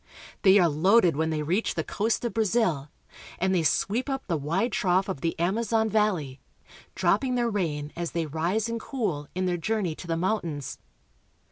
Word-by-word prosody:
They 195 Hz, 0 st, +6 dB
are 180 Hz, -4 st, +5 dB
loaded 175 Hz, +3 st, +4 dB
when 160 Hz, +2 st, 0 dB
they 155 Hz, -1 st, -1 dB
reach 180 Hz, +9 st, 0 dB
the 160 Hz, -, -1 dB
coast 220 Hz, +7 st, -1 dB
of 235 Hz, -, -2 dB
Brazil, 195 Hz, -10 st, +1 dB, 0.5 s
and 190 Hz, +1 st, +1 dB
they 180 Hz, -, +3 dB
sweep 220 Hz, -, 0 dB
up 270 Hz, -1 st, -3 dB
the 175 Hz, -, -1 dB
wide 170 Hz, -, -1 dB
trough 185 Hz, -1 st, +1 dB
of 185 Hz, -9 st, -4 dB
the 165 Hz, -, -1 dB
Amazon 220 Hz, +4 st, +1 dB
valley, 185 Hz, -12 st, 0 dB, 0.5 s
drop -, -, +2 dB
ping 255 Hz, -2 st, -1 dB
their 240 Hz, -1 st, +1 dB
rain 150 Hz, -7 st, -2 dB
as 170 Hz, -1 st, -3 dB
they 165 Hz, -1 st, -2 dB
rise 170 Hz, +9 st, -1 dB
and 230 Hz, 0 st, -3 dB
cool 200 Hz, -, -3 dB
in 185 Hz, 0 st, 0 dB
their 180 Hz, -1 st, 0 dB
journey 200 Hz, -1 st, -1 dB
to' 170 Hz, -, -10 dB
the 165 Hz, -1 st, -1 dB
mountains. 170 Hz, -, -2 dB
185 Hz, 190 wpm, -27 LUFS, 160-220 Hz, 0.5 s, They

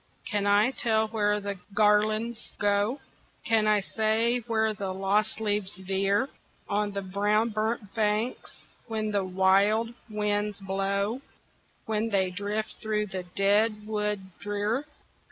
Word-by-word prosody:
can 205 Hz, -1 st, -1 dB
I 205 Hz, +5 st, +4 dB
tell 220 Hz, -4 st, +1 dB
where 210 Hz, -1 st, +1 dB
the 200 Hz, -2 st, -5 dB, 0.2 s
garlands 215 Hz, +2 st, +2 dB
go? 205 Hz, +6 st, +1 dB, 0.5 s
Can 220 Hz, -1 st, +3 dB
I 210 Hz, -1 st, +4 dB
say 225 Hz, +4 st, +1 dB
where 220 Hz, -1 st, +1 dB
the 200 Hz, -2 st, -4 dB
lost 195 Hz, +3 st, 0 dB
leaves 205 Hz, -3 st, -1 dB
veer 195 Hz, +5 st, +1 dB, 0.4 s
On 205 Hz, 0 st, 0 dB
the 200 Hz, 0 st, -4 dB
brown 205 Hz, +4 st, +1 dB
burnt 215 Hz, -1 st, -2 dB
banks, 220 Hz, +2 st, -1 dB, 0.2 s
when 215 Hz, -2 st, -2 dB
the 200 Hz, -1 st, +1 dB
wild 195 Hz, +5 st, +3 dB, 0.2 s
winds 210 Hz, -1 st, -1 dB
blow, 200 Hz, +4 st, -1 dB, 0.6 s
When 220 Hz, 0 st, 0 dB
they 190 Hz, -3 st, +1 dB
drift 205 Hz, +3 st, -3 dB
through 215 Hz, -1 st, 0 dB
the 185 Hz, -, -2 dB
dead 210 Hz, +2 st, +2 dB
wood 210 Hz, -1 st, -1 dB, 0.2 s
drear? 205 Hz, +6 st, -1 dB
210 Hz, 130 wpm, -28 LUFS, 200-220 Hz, 0.6 s, I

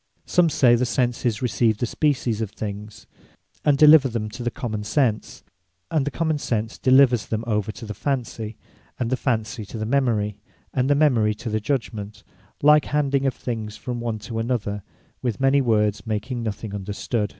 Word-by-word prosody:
Some 175 Hz, -2 st, +3 dB
say 130 Hz, -4 st, +4 dB
the 120 Hz, +1 st, +3 dB
Senses 120 Hz, -3 st, 0 dB
receive 115 Hz, -2 st, +2 dB
the 120 Hz, -, -1 dB
Species 125 Hz, -4 st, 0 dB
of 110 Hz, -, -2 dB
things, 105 Hz, 0 st, -7 dB, 0.6 s
and 145 Hz, -2 st, +3 dB
deliver 150 Hz, -1 st, +8 dB
them 110 Hz, -2 st, -3 dB
to 120 Hz, +3 st, -8 dB
the 120 Hz, -, 0 dB
Common 110 Hz, -4 st, -4 dB
sense; 115 Hz, -2 st, -1 dB, 0.5 s
and 150 Hz, -4 st, +1 dB
the -, -, +2 dB
Common 160 Hz, +2 st, -1 dB
Sense 115 Hz, -3 st, -2 dB
delivers 130 Hz, -3 st, +4 dB
them 110 Hz, 0 st, -2 dB
over 105 Hz, -2 st, -1 dB
to 115 Hz, +2 st, -9 dB
the 105 Hz, -, -5 dB
Fancy, 115 Hz, -3 st, -3 dB, 0.4 s
and 120 Hz, -1 st, -1 dB
the -, -, +3 dB
Fancy 110 Hz, -4 st, -2 dB
to 115 Hz, -, -8 dB
the 110 Hz, -, -3 dB
Memory, 115 Hz, -5 st, 0 dB, 0.3 s
and 130 Hz, +1 st, +1 dB
the 145 Hz, -, +4 dB
Memory 120 Hz, -8 st, +3 dB
to 110 Hz, +1 st, -6 dB
the 110 Hz, -, 0 dB
Judgement, 110 Hz, -3 st, -3 dB, 0.4 s
like 150 Hz, +1 st, +6 dB
handing 140 Hz, -2 st, +1 dB
of 130 Hz, -, -1 dB
things 110 Hz, -3 st, -5 dB
from 125 Hz, -1 st, -5 dB
one 115 Hz, -2 st, -2 dB
to 115 Hz, +1 st, -5 dB
another, 110 Hz, -3 st, -2 dB, 0.4 s
with 120 Hz, -5 st, -2 dB
many 135 Hz, +1 st, +4 dB
words 105 Hz, -3 st, +1 dB
making 110 Hz, +3 st, -2 dB
nothing 110 Hz, -1 st, -4 dB
understood. 105 Hz, +2 st, -2 dB
115 Hz, 180 wpm, -23 LUFS, 105-135 Hz, 0.6 s, deliver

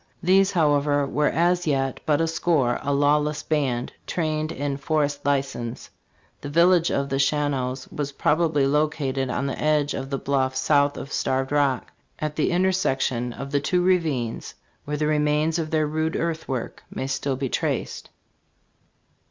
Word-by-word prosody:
These, 195 Hz, +2 st, +4 dB
however, 145 Hz, -3 st, +2 dB
were 150 Hz, +2 st, +1 dB
as 175 Hz, +1 st, +1 dB
yet 135 Hz, -3 st, 0 dB
but 150 Hz, 0 st, +3 dB
a 165 Hz, -, +1 dB
score; 160 Hz, -6 st, +1 dB
a 145 Hz, -, -2 dB
lawless 150 Hz, +1 st, +2 dB
band, 135 Hz, -6 st, -1 dB
trained 155 Hz, -2 st, -1 dB
in 140 Hz, 0 st, -3 dB
forest 145 Hz, 0 st, -1 dB
license."* 135 Hz, -4 st, -2 dB, 0.5 s
The 145 Hz, -, -6 dB
village 170 Hz, +2 st, +4 dB
of 140 Hz, 0 st, -1 dB
the 135 Hz, -, 0 dB
Shawanoes 140 Hz, -3 st, 0 dB
was 145 Hz, -1 st, -3 dB
probably 155 Hz, -1 st, +2 dB
located 140 Hz, -2 st, 0 dB
on 135 Hz, +2 st, -1 dB
the 135 Hz, -, -3 dB
edge 150 Hz, -1 st, +2 dB
of 135 Hz, -, -5 dB
the 135 Hz, -, -1 dB
bluff 130 Hz, -1 st, 0 dB
south 145 Hz, +2 st, +2 dB
of 140 Hz, -, -7 dB
Starved 130 Hz, +1 st, -1 dB
Rock, 140 Hz, -3 st, +1 dB, 0.3 s
at 155 Hz, -1 st, -3 dB
the 155 Hz, -, +1 dB
intersection 135 Hz, -10 st, 0 dB
of 135 Hz, +3 st, -7 dB
the 145 Hz, -, +2 dB
two 180 Hz, +4 st, +1 dB
ravines, 155 Hz, -11 st, 0 dB, 0.3 s
where 150 Hz, +1 st, -3 dB
the 150 Hz, -, 0 dB
remains 150 Hz, +2 st, +1 dB
of 160 Hz, -1 st, -2 dB
their 155 Hz, -1 st, +1 dB
rude 155 Hz, +1 st, -1 dB
earthwork 160 Hz, -7 st, -3 dB
may -, -, -4 dB
still 135 Hz, 0 st, -1 dB
be 135 Hz, +1 st, -2 dB
traced. -, -, -2 dB
145 Hz, 160 wpm, -24 LUFS, 135-155 Hz, 0.5 s, These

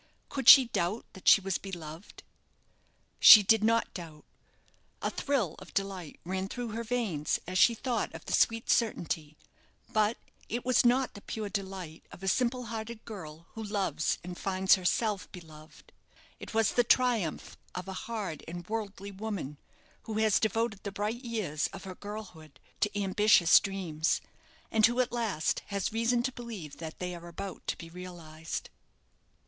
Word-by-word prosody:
Could 270 Hz, -4 st, +3 dB
she 270 Hz, -3 st, +11 dB
doubt 210 Hz, -1 st, -2 dB
that 190 Hz, -, -12 dB
she 200 Hz, -, +8 dB
was 190 Hz, -1 st, -1 dB
beloved? 170 Hz, -2 st, -9 dB, 1.0 s
She 210 Hz, -, +11 dB
did 220 Hz, +2 st, +4 dB
not 230 Hz, +1 st, +2 dB
doubt. 160 Hz, -4 st, -9 dB, 0.7 s
A -, -, -2 dB
thrill 245 Hz, -, 0 dB
of -, -, -14 dB
delight 195 Hz, -5 st, -3 dB
ran 190 Hz, +1 st, -2 dB
through 245 Hz, 0 st, -4 dB
her 225 Hz, +2 st, -4 dB
veins 215 Hz, -11 st, -1 dB
as 185 Hz, +1 st, -1 dB
she 235 Hz, -, +6 dB
thought 240 Hz, -2 st, -2 dB
of -, -, -10 dB
the -, -, -4 dB
sweet 225 Hz, 0 st, +2 dB
certainty; 160 Hz, -9 st, 0 dB, 0.6 s
but 215 Hz, +1 st, +2 dB, 0.3 s
it 240 Hz, +2 st, -3 dB
was 255 Hz, 0 st, +4 dB
not 250 Hz, +2 st, +3 dB
the 200 Hz, -, -11 dB
pure 215 Hz, 0 st, -5 dB
delight 190 Hz, -5 st, -5 dB
of 185 Hz, -, -12 dB
a -, -, -3 dB
simple 250 Hz, +4 st, +1 dB
hearted 225 Hz, 0 st, -6 dB
girl 165 Hz, -7 st, -9 dB
who 225 Hz, -, -7 dB
loves 195 Hz, -9 st, -1 dB
and 180 Hz, 0 st, -7 dB
finds 190 Hz, 0 st, +3 dB
herself 195 Hz, +2 st, 0 dB
beloved. 155 Hz, -3 st, -14 dB, 0.5 s
It -, -, -8 dB
was 225 Hz, -1 st, +2 dB
the 245 Hz, -, +3 dB
triumph 235 Hz, -8 st, +1 dB, 0.2 s
of 180 Hz, +1 st, -5 dB
a 190 Hz, -, -5 dB, 0.2 s
hard 205 Hz, -10 st, -4 dB
and 175 Hz, +1 st, -7 dB
worldly 205 Hz, -2 st, -4 dB
woman, 190 Hz, -8 st, -5 dB, 0.5 s
who 220 Hz, -, -5 dB
has 220 Hz, -2 st, +3 dB
devoted 220 Hz, -1 st, 0 dB
the 200 Hz, -, -5 dB
bright 210 Hz, +5 st, -3 dB
years 210 Hz, -11 st, -2 dB
of 195 Hz, -, -10 dB
her 190 Hz, -1 st, -7 dB
girlhood 180 Hz, -8 st, -9 dB, 0.2 s
to 210 Hz, 0 st, 0 dB
ambitious 195 Hz, -3 st, +5 dB
dreams; 175 Hz, -5 st, -1 dB, 0.5 s
and 220 Hz, -1 st, +2 dB
who, 240 Hz, +3 st, +5 dB
at 250 Hz, -, +2 dB
last, 225 Hz, -10 st, -1 dB
has 200 Hz, +2 st, -2 dB
reason 235 Hz, +1 st, +1 dB
to 260 Hz, -, -1 dB
believe 225 Hz, -, -8 dB
that 160 Hz, -1 st, -7 dB
they 180 Hz, 0 st, -4 dB
are 170 Hz, 0 st, -9 dB
about 190 Hz, +3 st, -7 dB
to -, -, -1 dB
be 165 Hz, -, -9 dB
realized. 165 Hz, -2 st, -7 dB
200 Hz, 165 wpm, -30 LUFS, 175-225 Hz, 1.0 s, she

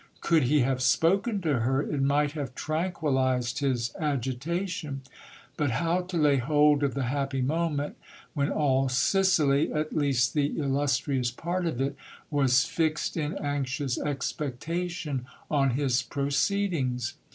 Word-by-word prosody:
Could 160 Hz, -5 st, +3 dB
he 145 Hz, +3 st, +3 dB
have 130 Hz, 0 st, 0 dB
spoken 195 Hz, -, +2 dB
to 150 Hz, -7 st, +1 dB
her, 130 Hz, +4 st, +1 dB
it 145 Hz, -2 st, -2 dB
might 145 Hz, +1 st, +2 dB
have 140 Hz, -4 st, -5 dB
tranquillized 140 Hz, -7 st, 0 dB
his 125 Hz, -5 st, -1 dB
igitation: 150 Hz, +3 st, -2 dB, 0.6 s
but 145 Hz, -2 st, +1 dB
how 165 Hz, +9 st, +1 dB
to 180 Hz, -1 st, -4 dB
lay 145 Hz, -3 st, +4 dB
hold 145 Hz, +2 st, +3 dB
of 140 Hz, -2 st, 0 dB
the 135 Hz, -, -1 dB
happy 135 Hz, +1 st, -1 dB
moment, 150 Hz, 0 st, -1 dB, 0.4 s
when 145 Hz, -2 st, 0 dB
all 135 Hz, -3 st, +2 dB
Sicily, 150 Hz, 0 st, +3 dB
at 155 Hz, 0 st, -2 dB
least 135 Hz, -5 st, +2 dB
.he 145 Hz, -1 st, 0 dB
illustrious 135 Hz, -2 st, 0 dB
part 175 Hz, +8 st, -2 dB
of 145 Hz, -7 st, -3 dB
it, 135 Hz, +1 st, -1 dB, 0.4 s
was 135 Hz, -4 st, +3 dB
fixed 155 Hz, +2 st, -1 dB
in 155 Hz, +2 st, -2 dB
anxious 140 Hz, -2 st, -2 dB
expectation 150 Hz, 0 st, -3 dB, 0.2 s
on 140 Hz, -3 st, +3 dB
his 130 Hz, 0 st, +1 dB
proceedings 140 Hz, -, -1 dB
145 Hz, 135 wpm, -27 LUFS, 130-155 Hz, 0.6 s, lay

